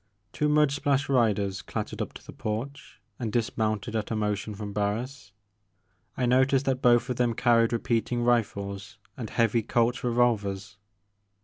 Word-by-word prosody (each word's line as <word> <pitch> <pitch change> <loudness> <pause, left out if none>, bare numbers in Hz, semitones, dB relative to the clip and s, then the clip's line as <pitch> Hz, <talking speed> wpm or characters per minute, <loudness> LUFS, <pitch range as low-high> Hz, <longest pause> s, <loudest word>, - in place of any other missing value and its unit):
Two 150 - 0
mud 150 -1 +4
splashed 140 -1 0
riders 105 -7 +1
clattered - - -5
up - - -3
to - - -12
the - - -10
porch 120 +7 -5 0.2
and 115 -3 -3
dismounted 110 -1 -1
at 110 -2 -2
a 115 - -1
motion 105 0 -2
from 105 0 -6
Barris. 105 +3 -3 0.9
I 125 - +1
noticed 130 +2 +3
that 130 -1 0
both 120 0 +4
of 125 - -3
them 120 -2 +1
carried 115 -2 +3
repeating 115 0 0
rifles 100 -2 -1 0.2
and 115 -5 -6
heavy 115 0 +2
Colt's 120 +3 0
revolvers. 105 -6 0
115 Hz, 150 wpm, -27 LUFS, 105-125 Hz, 0.9 s, mud